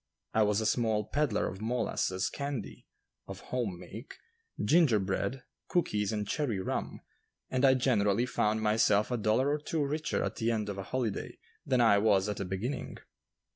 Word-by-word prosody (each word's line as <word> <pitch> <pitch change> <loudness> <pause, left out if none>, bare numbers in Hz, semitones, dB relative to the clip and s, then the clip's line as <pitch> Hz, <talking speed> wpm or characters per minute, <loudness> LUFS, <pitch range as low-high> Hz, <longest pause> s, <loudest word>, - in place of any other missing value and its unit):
I 110 - +3
was 105 0 +3
a 110 - -2
small 110 -1 +1
peddler 140 -5 0
of 95 +2 -7
molasses 110 -5 -1
candy 140 -5 -5 0.4
(of - - -7
home 110 -9 -1
make), 100 +7 -10 0.4
ginger 155 -8 +4
bread, 100 +7 -2 0.2
cookies 105 - 0
and 105 -2 -2
cherry 125 -9 -1
rum, 95 - -3 0.5
and 130 0 0
I 135 -1 +6
generally 115 -4 +2
found 110 -3 0
myself 105 0 +3
a 125 - +1
dollar 115 +6 +2
or 150 - 0
two 150 0 -1
richer 150 +2 -1
at - - -3
the 115 -1 0
end 110 -2 -1
of 100 -1 -4
a - - -3
holiday 120 -5 -2 0.3
than 130 -3 +3
I 100 -4 +5
was 100 -2 +3
at 105 -1 -3
the 100 - -3
beginning. 105 +9 -4
110 Hz, 175 wpm, -30 LUFS, 105-130 Hz, 0.5 s, I